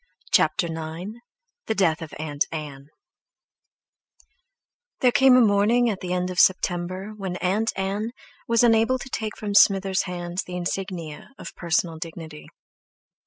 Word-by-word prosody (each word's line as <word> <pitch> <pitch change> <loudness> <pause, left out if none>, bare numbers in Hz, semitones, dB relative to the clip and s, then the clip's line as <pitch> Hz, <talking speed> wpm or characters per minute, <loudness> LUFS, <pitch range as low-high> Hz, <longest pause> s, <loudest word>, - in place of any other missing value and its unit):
CHAPTER 175 - +3
IX 165 +3 -6 0.6
DEATH 180 -7 +1
OF 160 -2 -7
AUNT 150 -2 -1
ANN 145 -3 -7 2.1
There 250 - +5
came 265 0 +6
a 255 - +6
morning 225 +3 +3
at 195 - -5
the 180 - -5
end 180 0 -1
of 180 - -3
September 185 +2 +1
when 190 -3 -5
Aunt 200 +5 0
Ann 200 +3 -2 0.4
was 230 0 +3
unable 230 +2 +4
to 260 - -9
take 215 -1 -4
from 205 -1 -4
Smither's 195 -1 +4
hands 175 0 -4
the 180 - -8
insignia 175 -3 -5
of - - -9
personal 170 -1 -1
dignity. 160 -2 -8
185 Hz, 135 wpm, -24 LUFS, 170-210 Hz, 2.1 s, came